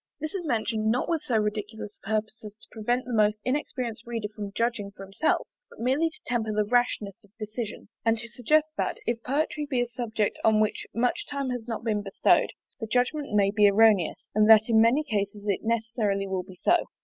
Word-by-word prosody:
This 310 0 -4
is 385 -3 -3
mentioned 220 -3 0
not 245 +3 +1
with 330 -3 0
so 240 -6 0
ridiculous 210 0 -3
a - - -12
purpose 220 +1 -2
as 210 -1 -9
to - - -19
prevent 240 +3 -1
the 250 - -5
most 215 -1 +3
inexperienced 255 -4 -3
reader 225 -3 -3
from 205 -2 -5
judging 230 -1 -1
for 195 -1 -11
himself; 195 +11 0 0.2
but - - -16
merely 270 +8 +2
to 320 - -17
temper 225 -3 -1
the 210 0 +1
rashness 230 -2 0
of 205 - -21
decision, 215 0 -5 0.2
and 225 0 +2
to 235 +1 -6
suggest 275 +7 +2
that - - -1
if 235 -1 -1
poetry 295 +3 -1
be 260 -4 0
a 245 - +2
subject 235 -3 -2
on 220 -1 +4
which 215 -1 0
much 245 +2 0
time 280 -2 -3
has 245 -2 -5
not 225 -1 -4
been 215 -3 0
bestowed, 195 -1 +2 0.3
the 225 - -4
judgment 250 +2 0
may 200 -1 +4
be 205 -1 +5
erroneous, 205 -4 +3
and 215 +1 +4
that 220 -1 +8
in 220 -1 +5
many 245 +7 +4
cases 205 -4 -2
it 200 - +1
necessarily 220 -3 0
will 190 -1 -1
be 185 0 -13
so. 340 - +2
225 Hz, 210 wpm, -27 LUFS, 210-245 Hz, 0.3 s, that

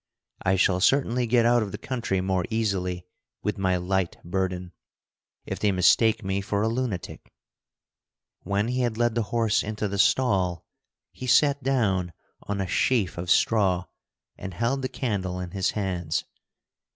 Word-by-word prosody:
I 95 +1 +2
shall 95 -1 +2
certainly 125 +2 +2
get 120 0 +3
out 120 0 +4
of 105 -2 -3
the - - -5
country 115 -7 -2
more 95 -1 0
easily 95 -6 -1 0.4
with - - -2
my 95 -1 +2
light 90 0 -1
burden, 90 0 -2 0.7
if - - -5
they 105 - +2
mistake 110 +4 +4
me 95 +1 -1
for 100 +1 -1
a - - +2
lunatic." 110 -9 -4 1.1
When 100 +3 -1
he 125 +1 -1
had 120 -3 -1
led 120 -1 +2
the 115 - 0
horse 115 -2 +2
into 105 0 -3
the 100 0 -4
stall, 95 -8 +2 0.5
he 130 - -8
sat 140 +2 +4
down 100 -10 0 0.3
on 100 -1 -4
a 95 - 0
sheaf 105 -6 +1
of 90 0 -5
straw 95 -4 +3 0.5
and 95 -2 -7
held 120 +6 0
the 130 - -2
candle 100 -8 -2
in 90 -1 -5
his 95 -1 0
hands. 90 -5 -1
100 Hz, 160 wpm, -26 LUFS, 90-115 Hz, 1.1 s, out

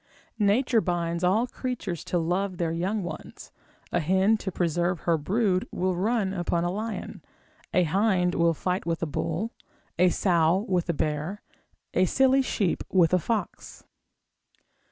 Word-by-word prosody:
Nature 220 +3 +3
binds 170 -2 -1
all 200 +7 +3
creatures 245 - -4
to 180 - -1
love 180 +3 -1
their 170 -2 -1
young 185 +5 -1
ones; 175 - -8 0.4
a 175 - +1
hen 190 +6 +3
to 200 -3 -4
preserve 175 0 0
her 170 - +2
brood 185 +4 0
will 185 0 -1
run 200 +1 0
upon 175 -2 -1
a 175 - 0
lion, 215 +3 -5 0.5
a 180 - +3
hind 180 0 +2
will 170 -1 +2
fight 180 +4 -1
with 165 0 -2
a - - +2
bull, 165 +8 -2 0.5
a 180 0 +6
sow 175 +2 +2
with 180 -3 0
a - - +2
bear, 155 +6 -2 0.5
a 185 - +3
silly 265 +6 +3
sheep 200 -8 -1
with 180 -2 +3
a 185 - +5
fox. 220 +6 -4
180 Hz, 155 wpm, -26 LUFS, 170-205 Hz, 0.5 s, a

